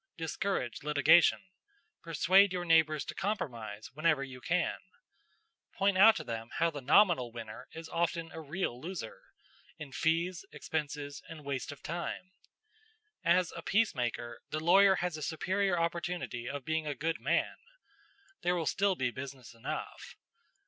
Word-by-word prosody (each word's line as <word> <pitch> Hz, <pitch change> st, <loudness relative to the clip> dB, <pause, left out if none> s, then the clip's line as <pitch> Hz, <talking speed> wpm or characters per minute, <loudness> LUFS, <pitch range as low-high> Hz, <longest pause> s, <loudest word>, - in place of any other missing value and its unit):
Discourage 160 Hz, -, -2 dB
litigation. 150 Hz, +3 st, +5 dB, 0.6 s
Persuade 185 Hz, +4 st, +4 dB
your 180 Hz, -1 st, -2 dB
neighbors 160 Hz, -3 st, +3 dB
to -, -, -5 dB
compromise 120 Hz, -, -4 dB
whenever 155 Hz, -1 st, +2 dB
you 130 Hz, -2 st, -9 dB
can. 180 Hz, +1 st, 0 dB, 1.0 s
Point 195 Hz, 0 st, +2 dB
out 215 Hz, +3 st, +8 dB
to -, -, -4 dB
them 115 Hz, 0 st, -5 dB
how 165 Hz, 0 st, +2 dB
the 145 Hz, -2 st, -6 dB
nominal 140 Hz, -, +4 dB
winner 115 Hz, -2 st, -8 dB
is 165 Hz, 0 st, -8 dB
often 165 Hz, -1 st, -1 dB
a 160 Hz, -, -7 dB
real 145 Hz, -5 st, -3 dB
loser 165 Hz, -9 st, -6 dB, 0.6 s
in 150 Hz, -3 st, -8 dB
fees, 165 Hz, +5 st, 0 dB
expenses, 145 Hz, -2 st, -4 dB
and 155 Hz, -3 st, -10 dB
waste 140 Hz, -1 st, -3 dB
of 145 Hz, -, -12 dB
time. 175 Hz, +2 st, -4 dB, 0.9 s
As 175 Hz, +1 st, +3 dB
a 170 Hz, -, -6 dB
peacemaker, 125 Hz, -, 0 dB
the 155 Hz, -, -2 dB
lawyer 190 Hz, +4 st, +6 dB
has 175 Hz, -3 st, -2 dB
a -, -, -8 dB
superior 175 Hz, +4 st, 0 dB
opportunity 170 Hz, -7 st, -2 dB
of 140 Hz, -1 st, -5 dB
being 160 Hz, 0 st, -1 dB
a 145 Hz, -, -2 dB
good 160 Hz, +3 st, -2 dB
man. -, -, 0 dB, 0.8 s
There 180 Hz, 0 st, +1 dB
will 165 Hz, -2 st, -1 dB
still 195 Hz, +2 st, +2 dB
be 125 Hz, -6 st, -1 dB
business 130 Hz, -1 st, -8 dB
enough. 115 Hz, -, -6 dB
160 Hz, 145 wpm, -32 LUFS, 140-175 Hz, 1.0 s, out